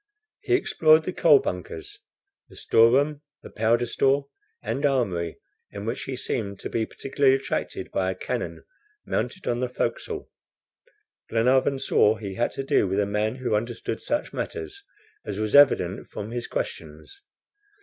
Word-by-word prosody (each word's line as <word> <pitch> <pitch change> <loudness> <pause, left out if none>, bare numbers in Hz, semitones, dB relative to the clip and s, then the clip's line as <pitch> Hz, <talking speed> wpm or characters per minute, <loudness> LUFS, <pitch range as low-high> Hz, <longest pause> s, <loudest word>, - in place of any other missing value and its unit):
He 370 - +1
explored 155 - +4
the 185 - -4
coal 155 -5 +6
bunkers, 90 -8 -5 0.5
the - - -16
store 115 +1 +4
room, 145 +4 +1 0.2
the - - -11
powder 115 +2 +2
store, 135 +3 +1 0.3
and 140 - -3
armory, 100 - 0 0.3
in 100 0 -7
which 115 +3 -4
last - - -6
he 130 - -2
seemed 100 -5 -3
to - - -6
be 110 -1 -1
particularly 135 0 +2
attracted 135 - -3
by 95 -1 0
a 95 - -2
cannon - - -4 0.4
mounted 185 - -3
on 120 0 0
the 125 0 -1
forecastle. 125 - -3 1.0
Glenarvan 130 +4 +3
saw 110 -5 +3
he 100 -3 -6
had 120 - 0
to 135 - -4
do 135 - +2
with 95 +2 0
a 100 - +2
man 105 +3 -1
who 130 -3 -2
understood 115 +1 -2
such 295 - -2
matters, 400 -2 -5 0.4
as - - -5
was 110 -1 -2
evident 115 -10 +5
from 105 +2 -6
his 120 0 -4
questions. 80 - -6
120 Hz, 160 wpm, -25 LUFS, 105-140 Hz, 1.0 s, coal